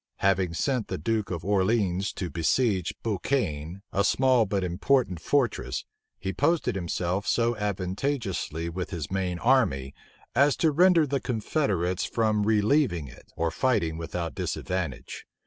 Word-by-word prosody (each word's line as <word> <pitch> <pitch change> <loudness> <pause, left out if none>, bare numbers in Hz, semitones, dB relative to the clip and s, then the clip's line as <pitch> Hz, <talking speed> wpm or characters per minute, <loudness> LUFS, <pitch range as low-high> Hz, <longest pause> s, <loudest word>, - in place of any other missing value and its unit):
Having 95 -3 +2
sent 125 - 0
the - - -3
duke 110 -2 -1
of 85 -2 -4
Orleans 100 -1 +1
to 90 -3 -4
besiege 95 +2 +1
Bouchaine, 95 - -2
a 100 - +2
small 125 0 +3
but 95 -1 -1
important 90 +2 +1
fortress, 105 - 0 0.3
he 95 -1 -4
posted 160 - +1
himself 90 +1 -2
so 120 0 +2
advantageously 95 - -2
with 90 +2 -4
his 80 -2 -5
main 95 -2 -1
army, 85 - +2 0.4
as 140 +3 +4
to 160 -3 +2
hinder 175 0 +5
the 140 -1 -1
confederates 105 - -1
from 110 -2 +1
relieving 105 - +2
it, 65 - -15
or 85 0 0
fighting 85 -9 +1
without 85 0 -4
disadvantage. 90 -8 -4
100 Hz, 135 wpm, -27 LUFS, 85-120 Hz, 0.4 s, hinder